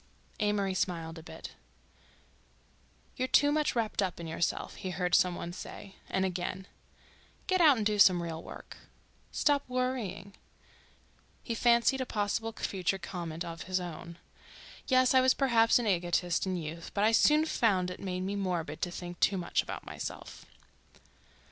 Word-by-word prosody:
Amory 205 -2 +1
smiled 165 -3 -2
a - - -10
bit. - - -9 1.7
"You're 255 - 0
too 290 +2 +4
much 300 -2 +1
wrapped 225 -3 0
up 185 -3 -2
in 170 - -6
yourself," 165 +1 -2
he 185 - -5
heard 180 -1 -2
some 180 -2 +4
one 170 0 -6
say. 195 +2 -9 0.2
And 190 0 +1
again— 185 +1 -3 0.8
"Get 370 -1 +2
out 300 -6 +7
and 215 - -1
do 210 0 +1
some 180 -3 +6
real 165 -1 -5
work—" - - -11 0.5
"Stop 285 -1 +2
worrying—" 240 -7 -2 1.1
He 230 - -3
fancied 235 +3 +3
a 260 - -3
possible 215 +2 -1
future 195 -3 -2
comment 175 -2 -5
of 165 0 -7
his 185 0 0
own. 170 -1 -7 0.7
"Yes—I 255 0 +5
was 260 0 +4
perhaps 230 -4 +4
an 240 - -1
egotist 175 -2 +1
in 185 -1 -1
youth, 165 0 -6
but 200 - +1
I 220 - +5
soon 300 +7 +5
found 190 - +1
it - - -8
made 185 -2 -3
me 195 +2 -2
morbid 175 -6 -3
to 180 - 0
think 175 0 -7
too 195 - +3
much 175 - 0
about - - -7
myself." - - -7
190 Hz, 160 wpm, -30 LUFS, 175-230 Hz, 1.7 s, out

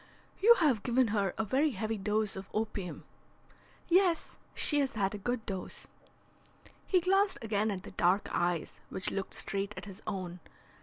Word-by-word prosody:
"You 465 +4 +8
have 285 - +3
given 245 0 +2
her 200 -3 0
a 220 - 0
very 275 +8 +2
heavy 220 +2 -1
dose 210 +1 0
of 190 0 -8
opium." 210 -4 -3 0.8
"Yes, 355 -1 +3 0.2
she 295 - +2
has 275 -1 0
had 200 -2 0
a 210 - -5
good 245 +2 -2
dose." 190 -2 -6 1.0
He 365 -2 +3
glanced 390 +3 +3
again 215 -1 +1
at 195 -2 -3
the - - -9
dark 180 +4 +2
eyes 175 -2 -1
which 190 - 0
looked 195 -1 -4
straight 195 +1 -2
at - - -6
his 195 -1 -10
own. 185 -3 -4
215 Hz, 165 wpm, -31 LUFS, 195-265 Hz, 1.0 s, You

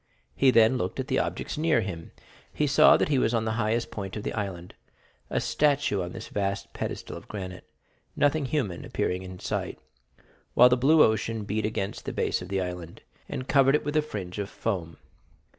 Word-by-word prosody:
He 135 - +4
then 115 +1 +5
looked - - -3
at 130 +2 -3
the 130 - +2
objects - - -3
near 155 -6 +3
him. 85 -5 -6 0.4
He 150 - 0
saw 140 - +6
that - - 0
he 140 -3 +3
was 120 -1 +2
on 110 -1 0
the 110 - 0
highest 115 +2 0
point 95 -2 -5
of 105 - -5
the - - -3
island,—a 95 -5 -6
statue 145 -9 +1
on 90 0 -4
this - - -8
vast 100 -1 -3
pedestal - - -5
of - - -13
granite, 95 -3 -7 0.5
nothing 145 0 +2
human 125 - -2
appearing 90 +1 -2
in 95 -1 -8
sight, - - -3 0.8
while 125 +1 +8
the 125 - +4
blue 150 +5 +5
ocean 110 0 0
beat 105 +1 -1
against 100 -2 -4
the - - -4
base - - 0
of 90 - -8
the 95 -1 0
island, 90 -2 -6 0.3
and 130 - -5
covered 135 0 +5
it 150 - -1
with 145 +1 -2
a 155 - +5
fringe 105 -10 -6
of 100 0 -3
foam. 85 -7 -3
110 Hz, 195 wpm, -27 LUFS, 95-135 Hz, 0.8 s, while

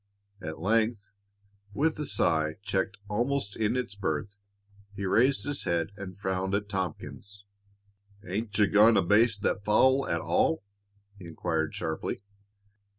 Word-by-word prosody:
At 80 -3 -5
length, 110 +2 0 0.6
with 155 +1 +1
a 150 - -2
sigh, 80 -6 +1
checked 95 -1 -1
almost 120 +1 -1
in 110 +2 0
its 125 -5 -3
birth, 100 0 -3 0.6
he 100 0 -4
raised 125 +8 +3
his 145 -1 -3
head 85 +1 0
and 95 -3 -8
frowned 95 0 -1
at 105 0 -2
Tompkins. 100 +1 -5 0.8
"Ain't 105 +4 -3
you 105 - +6
goin' 105 +3 +6
to - - +4
baste 105 +3 +3
that 100 - 0
fowl 130 +6 +4
at 85 - 0
all?" - - +1 0.6
he 90 - -9
inquired 80 -1 -2
sharply. 80 +4 -3
100 Hz, 140 wpm, -28 LUFS, 95-110 Hz, 0.8 s, you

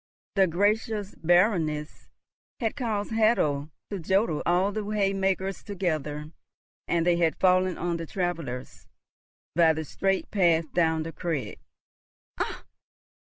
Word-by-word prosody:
The 195 -2 +4
gracious 205 +3 0
Baroness 165 -4 +1 0.5
had 225 -1 -1
caused 220 -7 -2
Hatto 185 -11 +2 0.2
to 200 - -3
jodel 190 -2 +1
all 180 +3 +3
the 215 +1 -3
hay 205 -1 0
makers 195 -1 -1
together, 155 -6 -3 0.6
and 170 -1 +1
they 175 -1 +3
had 165 -2 +1
fallen 185 -1 +3
on 175 -1 -1
the 165 -1 -6
travellers 165 - -4 0.7
by 165 -1 +5
the 160 0 -4
straight 195 +6 -1
path 170 -5 +2
down 160 -2 +2
the 165 - -5
crag. 165 -6 -3 0.8
"Ach! - - -3
175 Hz, 125 wpm, -27 LUFS, 160-200 Hz, 0.8 s, by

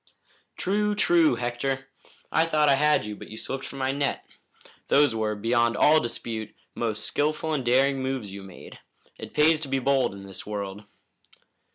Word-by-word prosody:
"True, 210 +2 0
true, 170 -8 +4
Hector! 125 +3 -2 0.5
I 160 +1 +3
thought 150 -2 +3
I - - +6
had 150 -3 +3
you, 105 0 -5
but - - -11
you 110 - -9
slipped 135 +3 -5
from 140 - -8
my 130 0 0
net. 140 0 -2 0.6
Those 145 -4 +4
were, 110 -1 -1
beyond 115 +1 +1
all 155 +1 +6
dispute, 115 -4 -5 0.2
most 110 -2 -2
skillful 155 +2 -1
and 140 -4 -1
daring 135 +3 +2
moves 130 -6 -3
you 100 - -7
made. 95 -2 -12 0.4
It - - -9
pays 155 +1 +5
to 155 - -4
be 135 0 0
bold 135 -5 +1
in 100 - -10
this 95 -1 -7
world." 105 0 -6
130 Hz, 175 wpm, -26 LUFS, 110-150 Hz, 0.6 s, I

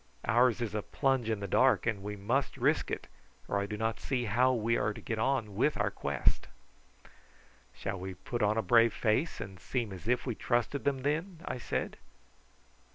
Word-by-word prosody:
Ours 120 +1 +3
is 110 -3 -2
a 105 - -1
plunge 135 -1 0
in 110 -2 -1
the 100 - -3
dark, 125 +3 +4
and 110 -4 0
we 105 +1 -5
must 120 +8 -1
risk - - +2
it, - - -3 0.4
or 100 - 0
I 100 - -2
do 105 0 -4
not 110 +1 -1
see 125 -3 -1
how 120 +4 +3
we 115 -1 +1
are 105 -1 0
to - - -8
get 115 -1 -3
on 115 -3 0
with 135 +8 +2
our - - +1
quest." - - 0 1.3
"Shall - - -4
we 95 0 -6
put 120 +5 -4
on 105 +1 +2
a 110 - +1
brave 115 +2 +5
face 125 +9 +1
and 95 -3 -7
seem 120 -6 -2
as 95 +3 -9
if 125 +1 +1
we 125 - -1
trusted 120 +5 -1
them 135 -2 0
then?" 160 +4 -1
I 125 - -3
said. - - -3
115 Hz, 200 wpm, -31 LUFS, 105-130 Hz, 1.3 s, brave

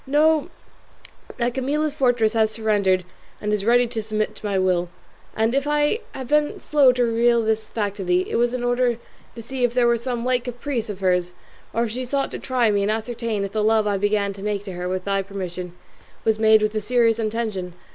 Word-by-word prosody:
Know 305 +2 +3 0.9
that 240 0 0
Camilla's 290 +4 -1
fortress 245 -6 +2
has 220 -1 +3
surrendered 205 -4 +1 0.3
and 210 0 -2
is 210 -2 0
ready 245 +1 +5
to 230 -1 -4
submit 215 0 -2
to - - -10
my 200 -1 0
will; 180 -2 +1 0.5
and 225 +2 +1
if 275 +1 0
I 295 +8 +2 0.2
have 260 -2 -6
been 300 0 +1
slow 285 -4 +4
to 250 0 +1
reveal 235 0 +3
this 220 0 -1
fact 205 -2 -3
to 195 - -4
thee, 180 0 +1
it - - -1
was 240 +1 +1
in 245 - -3
order 245 -1 +1 0.4
to 230 - -7
see 260 +2 -4
if 245 0 +1
it 245 - +4
were 235 0 +3
some 240 0 -3
light 250 -1 +1
caprice 245 -2 -3
of 200 -2 -6
hers, 180 -1 +1 0.4
or 230 - 0
if 230 - -2
she 255 +3 -3
sought 275 +2 -1
to - - -5
try 245 -4 +1
me 200 -1 +1
and 200 - 0
ascertain 225 -1 -2
if 195 - -6
the 215 0 -1
love 220 0 +3
I 205 -1 +1
began 205 0 0
to 195 - -11
make 205 -1 -2
to 195 -2 -7
her 180 +1 -4
with 185 0 -3
thy 195 0 +1
permission 185 -2 -6 0.5
was 220 -1 +2
made 220 -1 +5
with 215 0 0
a 215 - -1
serious 230 0 +2
intention. 215 -5 -3
225 Hz, 225 wpm, -22 LUFS, 205-245 Hz, 0.9 s, ready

